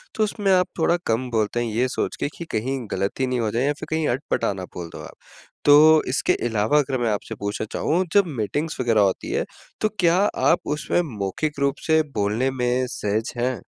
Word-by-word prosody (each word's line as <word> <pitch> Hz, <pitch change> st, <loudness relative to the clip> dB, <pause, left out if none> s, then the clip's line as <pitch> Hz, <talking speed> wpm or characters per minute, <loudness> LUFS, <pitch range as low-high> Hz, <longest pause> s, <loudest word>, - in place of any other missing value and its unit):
तो 220 Hz, -, +2 dB
उसमें 205 Hz, -1 st, 0 dB
आप 180 Hz, -1 st, +3 dB
थोड़ा 170 Hz, +2 st, +3 dB
कम 120 Hz, +3 st, 0 dB
बोलते 110 Hz, +1 st, 0 dB
हैं 115 Hz, -, -3 dB
ये 125 Hz, +3 st, +2 dB
सोच 130 Hz, -, -2 dB
के -, -, 0 dB
कि 170 Hz, -, -6 dB
कहीं 130 Hz, +5 st, -1 dB
गलती 100 Hz, +7 st, -1 dB
नहीं 125 Hz, -1 st, -1 dB
हो 110 Hz, -2 st, 0 dB
जाए 120 Hz, +3 st, 0 dB
या 145 Hz, -, +2 dB
फिर 155 Hz, -, -7 dB
कहीं 160 Hz, -1 st, 0 dB
अटपटा 125 Hz, -5 st, -1 dB
ना 95 Hz, -, -7 dB
बोल 85 Hz, -2 st, -6 dB
दो -, -, -7 dB
आप। -, -, -11 dB, 0.5 s
तो 155 Hz, +2 st, +7 dB
इसके 130 Hz, -, +1 dB
अलावा 110 Hz, +5 st, +1 dB
अगर 135 Hz, -2 st, 0 dB
मैं 120 Hz, -, +1 dB
आपसे 105 Hz, +2 st, -4 dB
पूछना 100 Hz, +1 st, -3 dB
चाहूँ 180 Hz, +4 st, 0 dB
जब 200 Hz, -2 st, +5 dB
मीटिंग्स 145 Hz, -, -2 dB
वग़ैरह 115 Hz, -4 st, +3 dB
होती 95 Hz, -2 st, 0 dB
है -, -, 0 dB, 0.4 s
तो 215 Hz, -, +2 dB
क्या 170 Hz, 0 st, +4 dB, 0.3 s
आप 170 Hz, -, +4 dB, 0.2 s
उसमें 150 Hz, +3 st, 0 dB, 0.2 s
मौखिक 140 Hz, +10 st, -2 dB
रूप 140 Hz, 0 st, +1 dB
से 160 Hz, 0 st, +5 dB
बोलने 105 Hz, +5 st, +1 dB
में 125 Hz, 0 st, 0 dB
सहज 105 Hz, +1 st, -2 dB
हैं? 125 Hz, 0 st, -1 dB
130 Hz, 210 wpm, -23 LUFS, 110-155 Hz, 0.5 s, तो